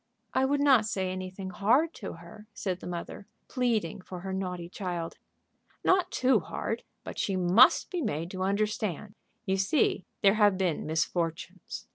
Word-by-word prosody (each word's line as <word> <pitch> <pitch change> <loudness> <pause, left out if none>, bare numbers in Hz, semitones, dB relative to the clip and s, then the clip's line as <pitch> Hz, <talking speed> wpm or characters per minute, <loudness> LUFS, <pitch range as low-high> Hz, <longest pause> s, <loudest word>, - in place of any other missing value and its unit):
"I 260 - +3
would 285 +1 +1
not 260 -7 +5
say 190 -3 -1
anything 185 +1 -6
hard 250 - +2
to 200 - -5
her," 175 +6 -13
said 185 -3 -2
the - - -8
mother, 175 +3 -6 0.2
pleading 225 -9 0
for 180 -1 -8
her 190 +1 -4
naughty 180 -2 -3
child. 175 -3 -5 0.6
"Not 370 -1 +3
too 260 -4 +3
hard, - - -4 0.2
but - - -7
she 195 - 0
must 185 +7 +5
be 360 -2 -1
made 170 - -2
to 185 - -5
understand. 210 0 -1 0.3
You 190 -1 +1
see 195 0 +1 0.2
there 195 -1 +7
have 205 -2 +5
been 180 -6 -1
misfortunes. 175 +6 -2
195 Hz, 160 wpm, -29 LUFS, 180-220 Hz, 0.6 s, there